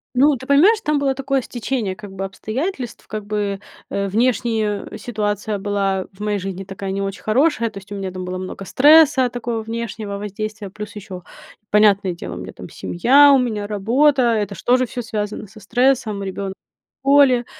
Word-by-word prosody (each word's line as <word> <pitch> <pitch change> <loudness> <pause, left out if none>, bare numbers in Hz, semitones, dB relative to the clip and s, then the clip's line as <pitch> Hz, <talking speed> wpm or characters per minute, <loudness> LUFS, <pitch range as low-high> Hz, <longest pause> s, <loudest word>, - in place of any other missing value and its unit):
Ну, 280 +3 +5
ты 260 +2 -10
понимаешь, 385 +11 +5
там 300 -5 +1
было 275 -1 +1
такое 275 0 -1
стечение, 235 -5 -3
как 205 -1 -10
бы 195 0 -4
обстоятельств. 245 - -4
Как 215 -1 -5
бы, 205 -2 -2 0.3
э, 200 0 -1
внешне 220 -1 0
ситуация 210 -2 -2
была 195 -2 -1
в 190 - -23
моей 210 -1 -1
жизни 195 0 -5
такая 195 0 -6
не 195 +1 -2
очень 195 +1 -4
хорошая, 235 +1 +2
то 205 - -12
есть 195 +1 -12
у - - -4
меня 190 -1 -4
там 185 0 -6
было 185 0 -4
много 185 +1 -7
стресса 290 - +6
такого 235 -1 -3
внешнего 220 -2 -5
воздействия, 210 0 -5
плюс 210 0 -8
еще 190 -3 -8 0.5
понятное 200 -3 +4
дело 170 - -7
у - - -7
меня - - -8
там - - -10
семья, 275 +10 +4
у 275 - +7
меня 215 -5 -1
работа, 240 +4 +3
это 205 -2 -1
ж - - -11
тоже 255 0 +3
всё 245 +2 -5
связано 210 -1 -4
со 215 +2 -15
стрессом, 230 -2 +1
ребенок 195 0 -4 0.5
в - - -10
школе, 265 -4 +5
215 Hz, 190 wpm, -20 LUFS, 200-255 Hz, 0.5 s, у